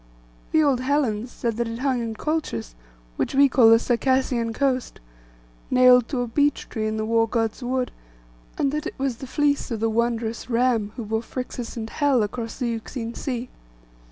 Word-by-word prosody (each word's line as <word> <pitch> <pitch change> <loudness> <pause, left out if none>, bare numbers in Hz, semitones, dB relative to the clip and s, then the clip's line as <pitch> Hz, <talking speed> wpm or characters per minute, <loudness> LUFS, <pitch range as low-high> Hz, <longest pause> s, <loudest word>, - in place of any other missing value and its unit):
The 315 - +4
old 275 -4 +3
Hellens 255 -4 0
said 230 -2 -3
that 235 0 0
it 230 0 -5
hung 260 -1 0
in 225 -1 -4
Colchis, 295 - -3 0.4
which - - -1
we 280 +1 +7
call 250 -4 +5
the 225 - +8
Circassian 245 -1 +1
coast, 260 +1 -1 0.7
nailed 250 -1 +6
to 260 -4 -2
a 245 - -2
beech 290 +5 +1
tree 215 -2 -2
in 215 0 -2
the 215 - -1
war 225 0 +2
God's 225 +1 -1
wood; 250 0 -1 0.7
and 275 - +1
that 300 +1 -2
it - - -7
was 265 -3 -1
the 265 - -8
fleece 290 +1 +1
of 230 -3 -3
the 225 +1 +1
wondrous 230 0 -1
ram 235 -3 +1
who 235 - -5
bore 220 +1 -1
Phrixus 245 -1 -6
and 220 -1 -4
Helle 270 -1 +2
across 225 +2 -4
the 245 -3 -1
Euxine 230 +1 -5
sea. 250 -2 -4
245 Hz, 185 wpm, -24 LUFS, 225-265 Hz, 0.7 s, the